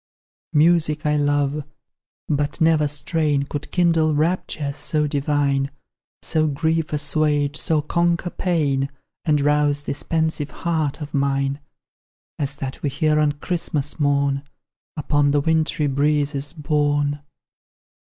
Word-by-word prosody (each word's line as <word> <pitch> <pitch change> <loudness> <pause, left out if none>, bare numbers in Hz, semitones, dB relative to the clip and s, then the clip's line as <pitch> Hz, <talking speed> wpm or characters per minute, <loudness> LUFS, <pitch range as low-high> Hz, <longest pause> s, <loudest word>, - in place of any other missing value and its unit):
Music 155 0 +3
I 150 0 +2
love 145 0 +1 0.6
but 145 +1 -1
never 160 -2 +4
strain 145 0 0
Could 145 +1 -5
kindle 165 -3 +2
raptures 150 -3 -1
so 150 -1 0
divine, 140 -1 0 0.5
So 155 -1 +1
grief 160 +2 0
assuage, 150 -1 +1
so 155 -1 +1
conquer 170 +2 0
pain, 145 -7 0 0.4
And 150 -2 +3
rouse 145 0 +2
this 145 - -3
pensive 160 -2 -1 0.2
heart 160 -3 0
of 145 - -9
mine 140 0 0 0.8
As 140 -1 -2
that 135 -1 -6
we 145 - 0
hear 150 +2 +1
on 150 -1 +2
Christmas 150 -2 -2
morn, 140 -1 +2 0.6
Upon 145 -1 +2
the 145 +1 +3
wintry 160 0 +1
breezes 145 0 0
borne. 145 -2 0
150 Hz, 120 wpm, -22 LUFS, 145-155 Hz, 0.8 s, never